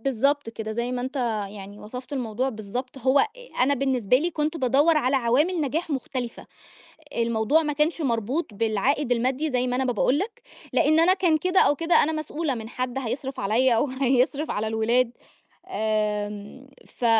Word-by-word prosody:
بالضبط 275 Hz, +2 st, +1 dB
كده، 220 Hz, -1 st, -5 dB
زي 235 Hz, +2 st, -2 dB
ما 250 Hz, -, -2 dB
أنت 260 Hz, +3 st, -5 dB, 0.3 s
يعني 200 Hz, 0 st, -10 dB
وصفت 250 Hz, +7 st, -9 dB
الموضوع 250 Hz, 0 st, -1 dB
بالضبط، 245 Hz, +4 st, -6 dB
هو 260 Hz, +3 st, +3 dB, 0.4 s
أنا 280 Hz, +3 st, +4 dB
بالنسبة 250 Hz, -4 st, +2 dB
لي 345 Hz, +4 st, -1 dB
كنت 305 Hz, +1 st, -1 dB
بادوّر 285 Hz, +5 st, +3 dB
على 270 Hz, -2 st, +2 dB
عوامل 290 Hz, +9 st, +2 dB
نجاح 310 Hz, +4 st, -2 dB
مختلفة، 255 Hz, -3 st, -4 dB, 0.7 s
الموضوع 230 Hz, +6 st, +2 dB
ما 295 Hz, -1 st, -1 dB
كانش 305 Hz, +4 st, 0 dB
مربوط 240 Hz, 0 st, -1 dB
بالعائد 235 Hz, +6 st, +1 dB
المادي، 260 Hz, +6 st, 0 dB
زي 255 Hz, -1 st, +1 dB
ما 250 Hz, -, -1 dB
أنا 265 Hz, -, 0 dB
ما 250 Hz, -, +1 dB
باقول 255 Hz, +5 st, +2 dB
لك، 430 Hz, +4 st, -5 dB, 0.3 s
لأن 310 Hz, 0 st, +4 dB
أنا 360 Hz, +3 st, +5 dB
كان 345 Hz, -5 st, +2 dB
كده 365 Hz, +4 st, +2 dB
أو 290 Hz, -, +4 dB
كده 330 Hz, +2 st, +1 dB
أنا 320 Hz, -, +1 dB
مسئولة 310 Hz, -2 st, -2 dB
من 225 Hz, -1 st, -7 dB
حد 255 Hz, +1 st, -3 dB
هيصرِف 265 Hz, +2 st, -4 dB
عليّا 230 Hz, +5 st, +3 dB
وهيصرِف 265 Hz, +3 st, +1 dB
على 215 Hz, +1 st, -1 dB
الولاد، 230 Hz, +3 st, +2 dB, 0.6 s
آمم 210 Hz, +3 st, -2 dB, 0.2 s
ف 240 Hz, -, -5 dB
255 Hz, 165 wpm, -25 LUFS, 230-290 Hz, 0.7 s, أنا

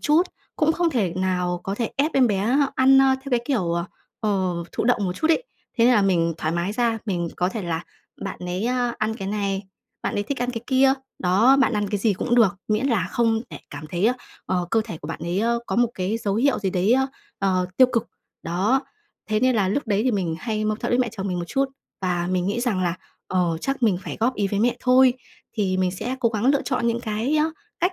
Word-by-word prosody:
chút, 305 Hz, +3 st, +4 dB, 0.3 s
cũng 310 Hz, +1 st, +3 dB
không 340 Hz, 0 st, +1 dB
thể 205 Hz, -, 0 dB
nào 180 Hz, -1 st, 0 dB
có 195 Hz, -, -2 dB
thể 230 Hz, +1 st, -2 dB
ép 295 Hz, +3 st, +1 dB
em 265 Hz, -2 st, +4 dB
bé 205 Hz, -2 st, 0 dB, 0.3 s
ăn, 265 Hz, +1 st, +6 dB
ơ, 270 Hz, -, +6 dB, 0.2 s
theo 275 Hz, -, -8 dB
cái 240 Hz, -1 st, +2 dB
kiểu, 220 Hz, -11 st, 0 dB
ờ, 170 Hz, 0 st, -1 dB, 0.4 s
ờ, 190 Hz, -4 st, 0 dB, 0.2 s
thụ -, -, -2 dB
động 240 Hz, -4 st, +2 dB
một 180 Hz, -, -1 dB
chút 315 Hz, -, 0 dB
ấy. 330 Hz, -, +3 dB, 0.4 s
Thế 230 Hz, -, +5 dB
nên 250 Hz, -, +6 dB
là 210 Hz, -, +4 dB
mình 170 Hz, -4 st, +2 dB
thoải 155 Hz, 0 st, -2 dB
mái 175 Hz, +4 st, -1 dB
ra, 230 Hz, 0 st, +1 dB
mình 175 Hz, -4 st, -1 dB
có 180 Hz, -, +1 dB
thể 215 Hz, +1 st, -4 dB
là 170 Hz, -1 st, -3 dB, 0.4 s
bạn -, -, -5 dB
ấy, 185 Hz, +5 st, -2 dB
ờ, 245 Hz, -1 st, 0 dB
ăn 215 Hz, +1 st, -1 dB
cái 195 Hz, -4 st, -5 dB
này, 200 Hz, -1 st, -1 dB, 0.4 s
bạn -, -, -2 dB
ấy 205 Hz, -, 0 dB
thích 270 Hz, +7 st, -4 dB
ăn 245 Hz, -, -1 dB
cái 230 Hz, -2 st, -4 dB
kia, 265 Hz, 0 st, +4 dB, 0.2 s
đó, 210 Hz, +9 st, +4 dB
bạn 270 Hz, -, +3 dB
ăn 205 Hz, -2 st, 0 dB
cái 205 Hz, -, -1 dB
gì 210 Hz, 0 st, +2 dB
cũng 240 Hz, +6 st, 0 dB
được, 230 Hz, -4 st, +6 dB, 0.2 s
miễn 215 Hz, +5 st, +1 dB
là 210 Hz, -9 st, +1 dB
không 225 Hz, -2 st, +2 dB
để -, -, -7 dB
cảm 155 Hz, -, -7 dB
thấy, 175 Hz, +7 st, +1 dB, 0.4 s
ờ, 180 Hz, -1 st, 0 dB
cơ 225 Hz, -, +3 dB
thể 165 Hz, -, -7 dB
của 150 Hz, -, -8 dB
bạn 160 Hz, -, -4 dB
ấy 175 Hz, +4 st, -1 dB, 0.2 s
có -, -, -2 dB
một 240 Hz, 0 st, +4 dB
cái 190 Hz, +4 st, -1 dB
dấu 200 Hz, -3 st, -1 dB
hiệu 270 Hz, +5 st, +2 dB
gì 195 Hz, -2 st, -1 dB
đấy, 190 Hz, +5 st, +3 dB, 0.4 s
ờ, 185 Hz, -2 st, +1 dB
tiêu 260 Hz, -, +7 dB
cực. 230 Hz, -, 0 dB, 0.4 s
Đó. 205 Hz, +11 st, +1 dB, 0.4 s
Thế 215 Hz, 0 st, 0 dB
nên 255 Hz, 0 st, +3 dB
là 195 Hz, -3 st, +2 dB
lúc 265 Hz, +8 st, -1 dB
đấy 210 Hz, -1 st, +1 dB
thì 255 Hz, -, +3 dB
mình 185 Hz, -7 st, -1 dB
hay 215 Hz, 0 st, -2 dB
mâu 215 Hz, 0 st, 0 dB
thuẫn -, -, -3 dB
với 245 Hz, -, +2 dB
mẹ 250 Hz, -2 st, +2 dB
chồng 200 Hz, -3 st, -4 dB
mình 180 Hz, -1 st, -2 dB
một 175 Hz, -, -2 dB
chút, 275 Hz, 0 st, +1 dB, 0.4 s
và 175 Hz, -1 st, 0 dB
mình 180 Hz, 0 st, 0 dB
nghĩ 205 Hz, +4 st, -1 dB
rằng 225 Hz, -7 st, 0 dB
là, 175 Hz, -2 st, 0 dB, 0.3 s
ờ, 175 Hz, -3 st, 0 dB
chắc 270 Hz, +3 st, -2 dB
mình 205 Hz, -6 st, +3 dB
phải -, -, -5 dB
góp 250 Hz, +3 st, +2 dB
ý 205 Hz, -1 st, 0 dB
với 200 Hz, +1 st, -1 dB
mẹ 240 Hz, +2 st, +2 dB
thôi, 255 Hz, 0 st, +5 dB, 0.4 s
thì 195 Hz, -4 st, 0 dB
mình 185 Hz, -1 st, +1 dB
sẽ 245 Hz, +8 st, -4 dB
cố 235 Hz, -, +3 dB
gắng 220 Hz, -1 st, -2 dB
lựa 280 Hz, 0 st, +3 dB
chọn 255 Hz, -3 st, -1 dB
những 235 Hz, 0 st, 0 dB
cái, 225 Hz, +6 st, -1 dB
ơ, 310 Hz, +1 st, +2 dB, 0.3 s
cách 360 Hz, +2 st, +2 dB
215 Hz, 250 wpm, -23 LUFS, 185-245 Hz, 0.4 s, tiêu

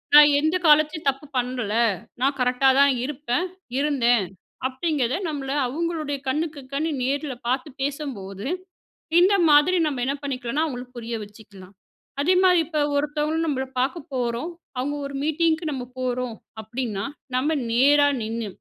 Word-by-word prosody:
நான் 295 Hz, -1 st, +9 dB
எந்த 315 Hz, +4 st, +1 dB
காலத்லயும் 305 Hz, 0 st, +4 dB
தப்பு 275 Hz, +2 st, -4 dB
பண்ணல, 245 Hz, -4 st, -1 dB, 0.5 s
நான் 275 Hz, +2 st, +2 dB
கரெக்ட்டா 250 Hz, +2 st, +3 dB
தான் 280 Hz, 0 st, +6 dB
இருப்பேன், 290 Hz, +3 st, -1 dB, 0.3 s
இருந்தேன் 245 Hz, -7 st, +2 dB, 0.4 s
அப்படிங்கிறத 265 Hz, -1 st, -1 dB
நம்மள 275 Hz, -3 st, -3 dB
அவுங்களுடைய 310 Hz, 0 st, -2 dB
கண்ணுக்கு 300 Hz, +1 st, -1 dB
கண்ணு 315 Hz, +3 st, 0 dB
நேர்ல 280 Hz, 0 st, -1 dB
பாத்து 260 Hz, +4 st, 0 dB
பேசும்போது, 255 Hz, -9 st, -4 dB, 0.8 s
இந்த 385 Hz, +3 st, +5 dB, 0.2 s
மாதிரி 295 Hz, +5 st, +5 dB
நம்ப 275 Hz, -4 st, -2 dB
என்ன 275 Hz, +2 st, 0 dB
பண்ணிக்கலான்னா 265 Hz, +1 st, -1 dB
அவுங்களுக்கு 250 Hz, -3 st, -7 dB
புரிய 230 Hz, 0 st, -4 dB
வச்சுக்கலாம். 205 Hz, -2 st, -14 dB, 0.5 s
அதேமாரி 365 Hz, +2 st, +4 dB
இப்போ 305 Hz, -1 st, -2 dB, 0.2 s
ஒருத்தவங்கள 300 Hz, +2 st, 0 dB
நம்ப 265 Hz, -3 st, -1 dB, 0.2 s
பாக்க 275 Hz, +7 st, 0 dB, 0.2 s
போறோம், 245 Hz, +5 st, -2 dB, 0.3 s
அவுங்க 285 Hz, +3 st, -1 dB
ஒரு 280 Hz, -, -8 dB
மீட்டிங்க்கு 320 Hz, +1 st, +1 dB
நம்ம 260 Hz, -3 st, -4 dB, 0.2 s
போறோம் 250 Hz, -2 st, -2 dB, 0.3 s
அப்டின்னா, 220 Hz, -2 st, -4 dB, 0.3 s
நம்ம 295 Hz, +5 st, +1 dB, 0.2 s
நேரா 285 Hz, +4 st, +5 dB
நின்னு, 225 Hz, 0 st, -3 dB
275 Hz, 130 wpm, -24 LUFS, 250-300 Hz, 0.8 s, நான்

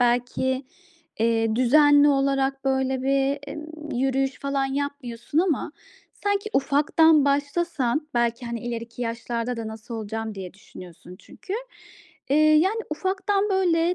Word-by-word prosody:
belki, 245 Hz, +2 st, +1 dB, 0.6 s
eee, 225 Hz, -1 st, +1 dB
düzenli 290 Hz, +3 st, +5 dB
olarak 275 Hz, -1 st, +1 dB
böyle 265 Hz, -1 st, 0 dB
bir, 275 Hz, +1 st, +1 dB
emm, 305 Hz, +1 st, -7 dB, 0.3 s
yürüyüş 265 Hz, +1 st, 0 dB
falan 275 Hz, -1 st, -1 dB
yapmıyorsun 275 Hz, -2 st, -3 dB
ama 325 Hz, -4 st, +1 dB, 0.5 s
sanki 405 Hz, +1 st, 0 dB
ufaktan 300 Hz, +1 st, +4 dB
başlasan 285 Hz, 0 st, 0 dB
belki, 235 Hz, 0 st, 0 dB
hani, 235 Hz, -1 st, -4 dB
"İleriki 235 Hz, 0 st, -5 dB
yaşlarda 235 Hz, +1 st, -3 dB
da 225 Hz, -1 st, -5 dB
nasıl 220 Hz, +2 st, -8 dB
olacağım?" 220 Hz, 0 st, -4 dB
diye 190 Hz, -2 st, -8 dB
düşünüyorsun 180 Hz, -2 st, -13 dB
çünkü. 380 Hz, -, -10 dB, 0.8 s
Eee, 285 Hz, -, +4 dB
yani, 310 Hz, +8 st, +4 dB
ufaktan, 390 Hz, +5 st, 0 dB
böyle 350 Hz, -2 st, +2 dB
270 Hz, 120 wpm, -24 LUFS, 235-305 Hz, 0.8 s, düzenli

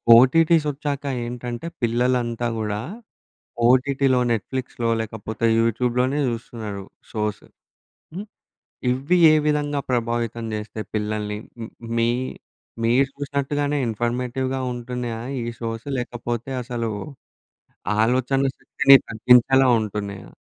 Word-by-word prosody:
OTTs 155 Hz, +6 st, +5 dB
ఒచ్చాక 145 Hz, 0 st, -4 dB, 0.2 s
ఏంటంటే 120 Hz, +3 st, -5 dB
పిల్లలంతా 120 Hz, 0 st, +1 dB
గూడా 105 Hz, -1 st, -2 dB, 0.9 s
ఓటీటీలో, 130 Hz, 0 st, +3 dB
నెట్‌ఫ్లిక్స్‌లో, 120 Hz, +1 st, -2 dB
లేకపోతే 110 Hz, +1 st, -3 dB
యూట్యూబ్‌లోనే 125 Hz, +4 st, +1 dB
చూస్తున్నారు 110 Hz, -4 st, -5 dB, 0.3 s
షోస్. 105 Hz, -1 st, -2 dB, 0.7 s
హ్మ్. 200 Hz, +4 st, -6 dB, 0.7 s
ఇవి 140 Hz, +8 st, +1 dB
ఏ -, -, +5 dB
విధంగా 145 Hz, -1 st, 0 dB
ప్రభావితం 115 Hz, -1 st, -1 dB
చేస్తాయి 105 Hz, -1 st, -6 dB
పిల్లల్ని? 105 Hz, 0 st, -2 dB, 0.6 s
మీ 115 Hz, 0 st, +3 dB, 0.8 s
మీరు 130 Hz, +4 st, +4 dB
చూసినట్టుగానే 145 Hz, +1 st, -1 dB
ఇన్ఫర్మేటివ్‌గా 125 Hz, +3 st, -2 dB
ఉంటున్నాయా? 120 Hz, -1 st, -4 dB, 0.2 s
ఈ -, -, -3 dB, 0.2 s
షోస్. 115 Hz, +2 st, -5 dB
లేకపోతే 120 Hz, +1 st, -4 dB
అసలు 115 Hz, -2 st, -3 dB, 1.1 s
ఆలోచన 130 Hz, +3 st, +2 dB, 0.2 s
శక్తిని 135 Hz, 0 st, +6 dB
తగ్గించేలా 125 Hz, +4 st, +5 dB
ఉంటున్నాయా? 100 Hz, -2 st, -5 dB
120 Hz, 90 wpm, -23 LUFS, 115-135 Hz, 1.1 s, శక్తిని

